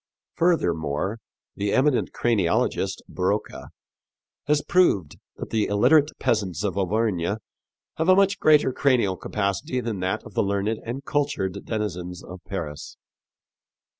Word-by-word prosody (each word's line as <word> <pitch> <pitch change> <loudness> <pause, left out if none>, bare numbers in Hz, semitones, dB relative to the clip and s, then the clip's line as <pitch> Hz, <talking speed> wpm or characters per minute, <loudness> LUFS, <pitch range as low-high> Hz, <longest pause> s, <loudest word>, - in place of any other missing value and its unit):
Furthermore, 90 - 0 0.4
the 100 0 -1
eminent 135 -1 +2
craniologist, 105 -8 0
Broca, 100 +4 -2 0.8
has 150 0 +2
proved 105 - +2 0.2
that - - -8
the 110 -2 +1
illiterate 145 +9 +4
peasants 95 -7 -1
of 100 -4 -1
Auvergne 100 -1 0 0.6
have 160 +3 +1
a 185 - +8
much 195 0 +3
greater 150 -4 +4
cranial 120 -10 +2
capacity 100 +6 -2
than 115 -5 -3
that 95 +4 -2
of - - -12
the - - +1
learned 100 +2 -1
and 125 +4 -6
cultured 120 -10 -1
denizens 90 -5 -4
of 90 +1 -9
Paris. 75 -6 -6
105 Hz, 125 wpm, -24 LUFS, 95-130 Hz, 0.8 s, a